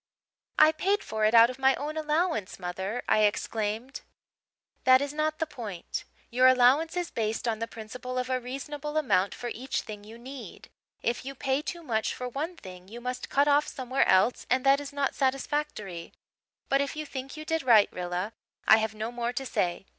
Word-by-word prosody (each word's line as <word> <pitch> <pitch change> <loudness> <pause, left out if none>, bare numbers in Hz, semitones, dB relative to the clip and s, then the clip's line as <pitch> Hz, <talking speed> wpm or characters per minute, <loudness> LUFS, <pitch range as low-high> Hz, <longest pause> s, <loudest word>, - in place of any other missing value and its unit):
"'I 310 0 +7
paid 390 +6 0
for 215 0 -1
it 215 +2 +3
out 230 +1 +8
of 255 - -12
my 265 0 +4
own 300 +2 -4
allowance, 310 - 0
mother,' 190 +6 -4
I - - +4
exclaimed. 215 +3 -1 0.8
"'That 255 0 +7
is 285 +1 -3
not 310 +1 0
the 320 - 0
point. 220 - -6 0.3
Your 255 +2 +5
allowance 260 +7 +4
is 355 -1 -2
based 225 +1 -2
on 220 -2 0
the 230 - -2
principle 250 +4 -7
of 250 0 -1
a 255 0 0
reasonable 290 +4 -5
amount 200 -10 +2
for 240 - -5
each 260 +4 -3
thing 210 -1 -9
you 220 +2 -11
need. 260 +2 -10 0.3
If 240 +1 -1
you 275 +1 -6
pay 270 +1 0
too 340 +2 -6
much 220 -7 -1
for 250 - -4
one 310 +8 -4
thing 185 -1 -11
you 230 +4 -9
must 250 +1 -5
cut 280 +1 +3
off 290 +1 +4
somewhere 260 +1 0
else 190 +6 +3
and 255 +1 +2
that 275 +1 +6
is 290 -1 -7
not 280 -1 -1
satisfactory. 265 - -2 0.5
But 275 0 +3
if 280 +1 -2
you 305 0 -4
think 270 +1 -7
you 310 - -7
did 325 +1 0
right, 230 -5 +6
Rilla, 180 +4 -3 0.3
I 220 - +9
have 220 0 -1
no 220 +2 -4
more 240 0 -2
to 270 - -3
say. 180 -6 -1
255 Hz, 200 wpm, -28 LUFS, 220-285 Hz, 0.8 s, I